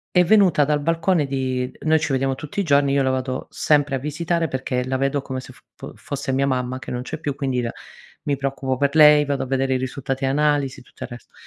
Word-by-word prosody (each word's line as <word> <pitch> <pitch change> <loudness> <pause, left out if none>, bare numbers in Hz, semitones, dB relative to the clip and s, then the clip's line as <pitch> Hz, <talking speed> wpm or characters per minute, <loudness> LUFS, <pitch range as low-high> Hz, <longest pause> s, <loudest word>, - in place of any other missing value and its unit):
è 180 - +6
venuta 185 -6 +4
dal 150 +1 +1
balcone 165 +1 +1
di 130 -2 -2
noi 160 0 +2
ci 150 -2 -1
vediamo 135 0 +1
tutti 150 +8 -5
i - - +2
giorni, 140 -5 +3
io 140 0 +3
la 130 - +1
vado 130 0 -3
sempre 145 -2 +1
a - - -1
visitare 165 +4 -1
perché 130 -1 -2
la 130 0 -1
vedo 135 +1 0
come 130 -1 -5
se - - -12
f - - -21 0.2
fo - - -9
fosse 140 -1 -4
mia 135 +1 +1
mamma, 130 -1 -1
che - - -9
non 125 0 -3
c'è 155 +5 -6
più, 145 -3 -3
quindi 135 -3 -1
la 120 -1 -2 0.5
mi 145 - -1
preoccupo 135 -1 -2
per 140 +1 +1
lei, 150 -1 +7
vado 140 -1 -1
a - - -8
vedere 135 0 0
i - - +2
risultati 135 +1 -4
e - - +3
analisi, 145 -1 +1
tutto - - -11
il - - -8
resto. 120 -2 -12
140 Hz, 245 wpm, -22 LUFS, 130-150 Hz, 0.5 s, lei